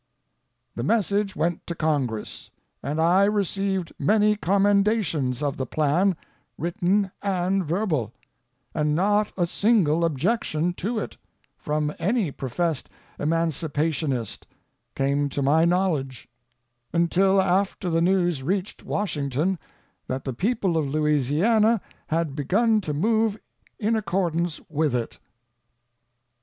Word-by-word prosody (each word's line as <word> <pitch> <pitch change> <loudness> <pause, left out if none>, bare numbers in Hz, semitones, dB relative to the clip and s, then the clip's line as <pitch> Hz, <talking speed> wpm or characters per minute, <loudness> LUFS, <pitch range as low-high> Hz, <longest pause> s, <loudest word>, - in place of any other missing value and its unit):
The - - -4
message 205 -2 +1
went 170 +1 -1
to 170 - -3
Congress, 140 -9 -2 0.3
and 150 +3 -3
I 180 +4 +4
received 195 -3 -1
many 210 0 +3
commendations 200 - +1
of 140 -2 -1
the 130 - -3
plan, 160 +7 +1 0.4
written 190 +3 0
and 190 -1 0
verbal; 160 - -1 0.6
and 150 -1 +1
not 205 +4 +2
a 175 - +2
single 170 -4 +2
objection 165 - 0
to 215 +7 -3
it, - - -4 0.4
from 150 0 -2
any 205 - +1
professed 140 +4 -2 0.3
emancipationist, 155 -5 -1 0.5
came 140 +1 +1
to 140 +1 -2
my 155 +4 +4
knowledge, 170 -8 0 0.6
until 185 +3 +3
after 190 +1 +1
the 165 0 +2
news 175 -4 +2
reached 185 +7 -2
Washington 160 -2 -1 0.5
that 130 +1 -3
the 130 - -3
people 190 - 0
of 155 -3 0
Louisiana 155 - +2 0.3
had 160 -3 -1
begun 215 - +2
to 155 -6 -3
move 220 +5 +1 0.4
in 220 +1 +1
accordance 175 -6 -1
with 155 -4 0
it. 120 -2 -3
170 Hz, 115 wpm, -24 LUFS, 150-200 Hz, 0.6 s, I